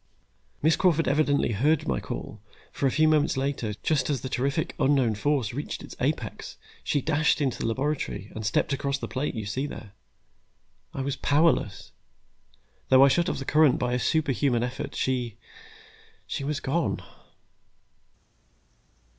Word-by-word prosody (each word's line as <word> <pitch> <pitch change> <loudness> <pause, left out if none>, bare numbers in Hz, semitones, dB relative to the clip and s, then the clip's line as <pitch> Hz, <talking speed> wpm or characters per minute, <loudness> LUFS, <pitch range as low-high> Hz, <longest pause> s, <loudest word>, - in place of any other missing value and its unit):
"Miss 160 0 +5
Crawford 165 -3 +2
evidently 145 -2 +2
heard 145 +9 +1
my 65 -2 0
call, 105 - -7 0.3
for 140 - 0
a - - +1
few 155 +3 +3
moments 155 -2 +2
later, 130 -6 -2
just 155 -3 +1
as 140 -3 -1
the 130 - -5
terrific 140 +5 -1
unknown 130 -5 +3
force 125 0 0
reached 145 +4 -5
its - - -10
apex, - - -3 0.3
she 145 - 0
dashed 155 +2 +2
into 135 -4 -1
the - - -1
laboratory, 130 -4 -2
and 110 - -6
stepped 110 +6 +1
across 140 0 -1
the - - -5
plate 135 +1 -3
you 110 -2 -4
see 130 +8 -2
there. 105 -7 -9 1.0
"I 135 - -4
was 135 0 -2
powerless. 145 - +1 1.0
Though 130 +1 +8
I - - +5
shut 170 +5 +2
off - - -2
the 135 - -5
current 150 -2 +4
by 125 - -1
a 125 - +1
superhuman 140 -5 +1
effort, 125 +1 -4
she 125 -4 -1 0.9
she - - -4
was 145 +1 -2
gone!" 160 +3 -1
140 Hz, 155 wpm, -26 LUFS, 125-150 Hz, 1.0 s, Though